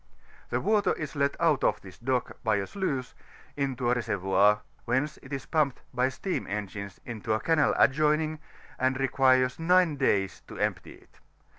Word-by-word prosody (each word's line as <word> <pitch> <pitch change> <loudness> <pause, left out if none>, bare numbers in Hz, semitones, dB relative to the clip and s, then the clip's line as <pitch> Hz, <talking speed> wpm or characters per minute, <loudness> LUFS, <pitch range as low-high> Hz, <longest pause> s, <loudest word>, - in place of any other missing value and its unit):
The - - 0
water 210 -1 +2
is 155 -1 -6
let 140 0 0
out 160 -5 +2
of - - +2
this 95 -2 -13
dock 125 +1 -2
by 110 -3 +2
a 100 -1 -1
sluice, 135 - -3 0.4
into 135 -3 -2
a 120 - +4
reser 120 -4 -1
voir, 100 +3 +3 0.2
whence 130 +5 0
it - - -14
is 135 -2 -4
pumped 150 -5 0
bv 125 +2 +2
steam 185 +7 -3
engines 100 -1 -5
into 110 -2 -3
a 110 - +1
canal 160 0 +2
adjoining, 155 +2 +2 0.4
and 130 +1 +1
requires 130 -1 +3
nine 175 -2 +3
days 95 -6 +1
to - - -10
empty - - -2
it. - - -23
130 Hz, 170 wpm, -28 LUFS, 110-150 Hz, 0.4 s, a